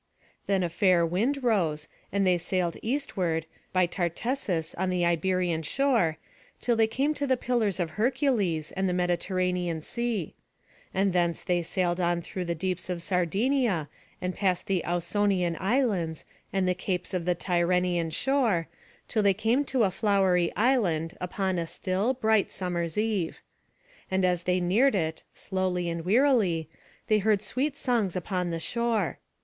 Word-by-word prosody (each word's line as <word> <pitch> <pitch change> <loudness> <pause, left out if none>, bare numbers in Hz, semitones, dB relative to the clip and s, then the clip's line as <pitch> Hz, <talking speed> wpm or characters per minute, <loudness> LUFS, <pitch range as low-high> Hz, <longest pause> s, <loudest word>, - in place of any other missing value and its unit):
Then 195 -2 +2
a 175 - 0
fair 175 0 +3
wind 235 - 0
rose, 165 -10 +1 0.2
and 200 0 +1
they 180 -1 +3
sailed 175 -1 -1
eastward, 190 - -1 0.3
by 185 -1 +3
Tartessus 175 - -2
on 190 - -1
the 180 -1 +1
Iberian 175 0 +1
shore, 205 - +1 0.4
till 240 - +1
they 225 -1 +4
came 270 +7 0
to 285 -1 -2
the 260 -1 +2
Pillars 230 -6 0
of 170 -3 -1
Hercules, 215 - 0
and 190 0 -1
the - - 0
Mediterranean 180 -1 0
Sea. 235 -6 -2 0.6
And 195 0 +1
thence 170 -2 +1
they 180 -2 +1
sailed 175 +1 -1
on 175 -1 +1
through 185 +1 -5
the 170 0 -2
deeps 185 +1 -3
of 175 -2 -3
Sardinia, 195 - +1 0.3
and 180 0 -2
past 185 -3 0
the 190 -3 0
Ausonian 180 0 +1
Islands, 195 - 0 0.3
and 190 -1 +1
the 180 - +3
capes 180 0 -3
of 180 -2 -1
the 180 -1 +2
Tyrrhenian 175 -1 +1
shore, 225 - +1 0.4
till 220 - +1
they 200 -2 +4
came 230 +7 +2
to 260 -3 +1
a 195 - +2
flowery 190 -4 +2
island, 190 -10 +1
upon 185 0 -1
a 165 - -2
still, 195 +10 0
bright 220 -4 +2
summer's 170 -2 -2
eve. 210 -6 -1 0.7
And 190 0 +2
as 180 -1 0
they 180 0 +2
neared 210 +9 +3
it, 160 -4 -1
slowly 185 -2 -1
and 165 0 -4
wearily, 200 - +3 0.4
they 215 -1 +3
heard 210 0 +2
sweet 275 +7 -2
songs 225 -8 0
upon 180 0 -2
the 165 -1 -2
shore. 225 -1 -1
185 Hz, 155 wpm, -27 LUFS, 175-220 Hz, 0.7 s, they